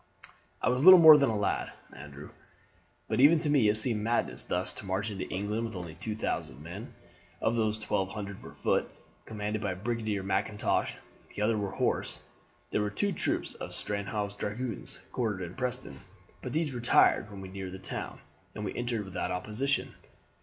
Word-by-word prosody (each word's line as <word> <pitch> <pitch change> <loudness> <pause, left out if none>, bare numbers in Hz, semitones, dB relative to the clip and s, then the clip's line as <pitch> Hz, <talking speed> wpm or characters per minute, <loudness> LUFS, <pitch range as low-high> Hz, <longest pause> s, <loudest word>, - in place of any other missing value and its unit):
"I - - +3
was 125 +2 +1
little 185 +2 +11
more 160 -2 +11
than 140 -3 +4
a 110 - 0
lad, 105 - -1 0.2
Andrew, 70 +1 -10 0.8
but 110 - -1
even 150 +5 +8
to 150 -2 0
me 130 -8 +5
it 105 - +3
seemed 110 -1 +3
madness 115 +2 0
thus 90 +1 -2
to - - -9
march 100 +3 -1
into 95 -2 -5
England 105 +4 -2
with 115 -2 -6
only 85 -3 -6
two 105 +6 -4
thousand 110 - -3
men. - - -8 0.4
Of 115 - +1
these 110 -2 +1
twelve 95 -3 -1
hundred 100 -1 -6
were - - -11
foot, - - +1 0.4
commanded 105 0 -3
by 100 -3 -1
Brigadier 110 -1 -2
Mackintosh; 100 +2 0 0.4
the 105 - -1
others 110 +1 +2
were 100 -1 -2
horse. - - 0 0.5
There - - +1
were 105 - 0
two 200 - 0
troops 175 - -1
of - - -6
Stanhope's 100 0 -2
dragoons 110 +3 -4
quartered 105 -7 -1
in 85 0 -6
Preston, 125 - -4 0.4
but - - -5
these 155 -3 0
retired 120 -3 +4
when 100 -1 -9
we 95 -1 -8
neared 95 -1 -6
the - - -6
town, 95 -1 -6 0.3
and 105 - -4
we - - -3
entered 120 -3 -2
without 95 - -3
opposition. 110 +10 -1
105 Hz, 180 wpm, -30 LUFS, 95-120 Hz, 0.8 s, little